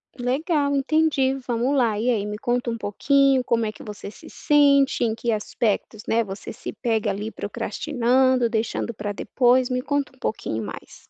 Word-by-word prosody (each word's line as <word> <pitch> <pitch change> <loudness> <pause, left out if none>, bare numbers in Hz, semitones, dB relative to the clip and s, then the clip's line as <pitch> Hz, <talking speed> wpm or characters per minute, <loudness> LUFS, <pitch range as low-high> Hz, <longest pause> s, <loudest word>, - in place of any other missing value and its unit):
Legal, 285 +4 0
entendi. 280 -1 +2
Vamos 245 +3 0
lá! 230 -6 +2
E 235 +3 0
aí, 215 -5 +1
me 210 0 -4
conta 245 0 -1
um 230 - -3
pouquinho 265 +5 +2
como 230 -2 +1
é 215 - -2
que - - -12
você 210 -1 -8
se 315 +9 -14
sente. 280 -3 +3
Em 225 - +1
que 230 +1 -2
aspectos, 215 0 -2
né, 230 +1 +2
você 195 -1 -7
se - - -7
pega 225 -3 -1
ali 205 +2 -4
procrastinando, 255 -2 +1
deixando 230 +1 -2
para 210 -1 -4
depois, 245 +4 +2
me 250 0 -1
conta 285 -1 -2
um - - -28
pouquinho 115 - -3
mais. 100 - -10
245 Hz, 180 wpm, -23 LUFS, 220-270 Hz, -, sente